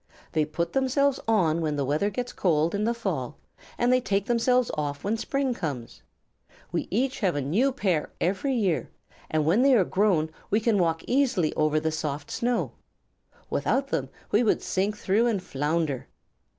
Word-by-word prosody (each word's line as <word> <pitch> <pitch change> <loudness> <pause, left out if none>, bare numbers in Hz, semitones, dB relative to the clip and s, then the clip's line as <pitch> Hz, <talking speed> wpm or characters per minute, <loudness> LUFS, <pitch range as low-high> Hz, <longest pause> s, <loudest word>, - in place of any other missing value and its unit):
"They 155 -1 +1
put 170 +3 -3
themselves 270 +1 +2
on 170 -7 +2
when 155 -2 -1
the 140 -1 -1
weather 150 +9 +1
gets 245 +4 -4
cold 165 -3 +1
in 205 +1 0
the 235 - +2
fall, 235 - -3 0.4
and 245 +1 +3
they 255 - +3
take 200 -4 0
themselves 245 +1 +2
off 145 -1 -3
when 210 +3 0
spring 265 +3 -1
comes. 145 - -5 0.7
We - - -2
each 255 +6 0
have 190 -7 +1
a - - 0
new 205 - +2
pair 185 - -1
every 200 +10 0
year, 180 - 0 0.4
and 155 -1 +1
when 180 +10 +4
they 270 0 +5
are 205 - +5
grown 180 -6 +1 0.2
we 210 - +3
can 220 -2 +2
walk 165 -2 +1
easily 245 - +1
over 155 0 +2
the 160 +1 -1
soft 150 -2 -4
snow. 240 -1 0 0.8
Without 275 +1 0
them 135 - -1 0.2
we 210 - +4
should 220 - +1
sink 200 +3 -1
through 210 +4 +2
and 220 -4 +1
flounder." 150 -3 -1
195 Hz, 175 wpm, -26 LUFS, 155-240 Hz, 0.8 s, they